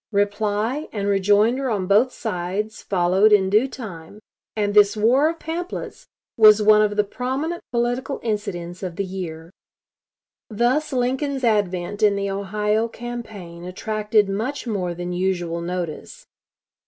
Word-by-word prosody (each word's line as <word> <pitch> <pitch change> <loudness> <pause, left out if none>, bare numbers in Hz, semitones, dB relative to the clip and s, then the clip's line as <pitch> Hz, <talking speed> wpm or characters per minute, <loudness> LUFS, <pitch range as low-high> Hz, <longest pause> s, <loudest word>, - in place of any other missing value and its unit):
Reply 210 +6 0
and 200 -2 -3
rejoinder 205 +7 +2
on 200 -5 -1
both 210 +7 +3
sides 210 +1 -4
followed 190 +3 +3
in 190 -2 +4
due 215 +6 +4
time; 205 -7 -9 0.4
and 205 -1 0
this 205 0 +5
war 255 +8 +4
of 330 - -4
pamphlets 340 +3 -6 0.3
was 215 -1 +7
one 215 0 +5
of 210 -1 +1
the 210 - +3
prominent 265 +10 -3
political 245 +3 -1
incidents 180 -5 -4
of 180 -3 -5
the 200 +2 -2
year. 170 -3 -7 1.0
Thus 245 +8 +1
Lincoln's 265 +2 -1
advent 205 -3 0
in 210 -2 +4
the 200 0 -2
Ohio 210 +3 0
campaign 220 -8 -8
attracted 210 +3 0
much 225 +10 -3
more 185 -6 -2
than 175 +1 -4
usual 175 -2 -1
notice. 180 - -5
210 Hz, 135 wpm, -22 LUFS, 190-240 Hz, 1.0 s, was